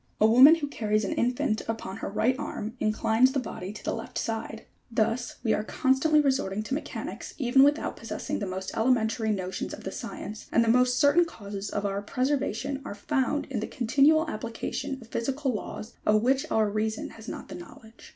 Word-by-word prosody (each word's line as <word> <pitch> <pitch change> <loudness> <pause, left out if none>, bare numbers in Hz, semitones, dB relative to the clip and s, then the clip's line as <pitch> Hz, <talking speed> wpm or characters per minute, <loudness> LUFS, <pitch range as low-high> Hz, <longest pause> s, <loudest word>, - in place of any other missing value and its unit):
A 215 - +5
woman 255 +8 +8
who 310 -3 -3
carries 215 -6 0
an - - -1
infant 240 -3 0
upon 225 -3 -4
her - - -4
right 235 +5 +1
arm 225 -5 -5
inclines 220 +4 +3
the 275 - +1
body 190 -6 -6
to 215 - -10
the - - -1
left 225 - -6
side: 225 -1 -4 0.2
thus, 230 +2 0
we 225 - +2
are 210 - 0
constantly 265 +7 +2
resorting 260 -8 +1
to 240 - -4
mechanics, 295 - -5
even 265 -1 +4
without 290 +2 +3
possessing - - -4
the 200 - -3
most 190 +1 -5
elementary 225 -1 +1
notions 190 -3 -3
of - - -13
the - - -4
science, 210 0 -7
and 235 - +4
the - - -2
most 250 +1 +4
certain 300 +4 +5
causes 205 -9 -7
of 205 0 -2
our 200 0 -1
preservation 270 +2 -1
are 205 - -6
found 275 +6 0
hi 230 - 0
the 215 - -3
continual 285 +7 +3
application 265 +3 -4
of - - -16
physical 265 +3 -1
laws, 215 +1 -6
of 215 0 +3
which 270 +4 +2
our 220 -5 +2
reason 215 +1 -2
has 225 0 -12
not - - -6
the - - -7
knowledge. 220 +6 -12
230 Hz, 195 wpm, -27 LUFS, 215-270 Hz, 0.2 s, woman